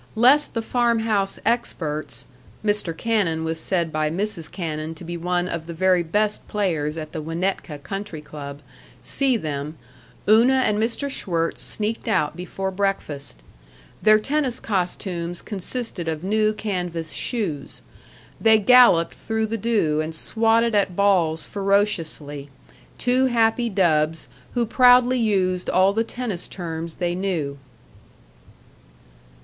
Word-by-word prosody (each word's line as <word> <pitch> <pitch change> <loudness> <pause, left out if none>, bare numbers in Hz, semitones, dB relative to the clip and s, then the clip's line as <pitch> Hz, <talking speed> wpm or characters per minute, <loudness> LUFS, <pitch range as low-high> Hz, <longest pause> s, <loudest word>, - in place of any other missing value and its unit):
Lest 260 +7 +4
the 230 - -1
farm 235 0 +2
house 205 -3 0
experts 155 - -2 0.4
(Mr. 205 -6 0
Cannon 195 -9 0
was 160 0 -2
said 170 -1 -1
by 155 0 0
Mrs. 170 -2 -3
Cannon 160 -3 -4
to 160 - -10
be 175 +1 -5
one 175 +1 -1
of 170 -3 -4
the 170 - -6
very 185 +1 +3
best 205 +5 -1
players 165 -7 -1
at 155 -1 -6
the 160 - -4
Winnetka 165 0 -2
Country 195 +1 -5
Club) 145 -1 -9 0.4
see 270 -3 +1
them, 150 -3 -4 0.5
Una 245 +5 +5
and 210 0 +1
Mr. 230 +5 -1
Schwirtz 170 -11 -2
sneaked 220 +2 -3
out 185 -9 +1
before 190 +2 -4
breakfast. 185 - -3 0.6
Their 215 0 +6
tennis 270 +2 -1
costumes 175 -3 -2
consisted 205 -2 -4
of 160 0 -3
new 215 +2 +2
canvas 175 -7 -4
shoes. 175 - -3 0.6
They 220 -1 +6
galloped 215 -6 +6
through 220 0 -2
the 220 +1 -3
dew 200 -9 +1
and 160 +1 -4
swatted 225 +5 +2
at 200 -3 +1
balls 175 -5 +2
ferociously 170 -8 -1 0.5
two 255 +1 +2
happy 235 0 +2
dubs 165 -5 +1 0.3
who 240 -1 +2
proudly 250 +2 +5
used 185 -5 +1
all 190 +2 +4
the 225 +2 +1
tennis 230 -6 -5
terms 165 -2 -5
they 175 -1 -1
knew. 170 -7 -2
190 Hz, 130 wpm, -23 LUFS, 160-220 Hz, 0.6 s, Their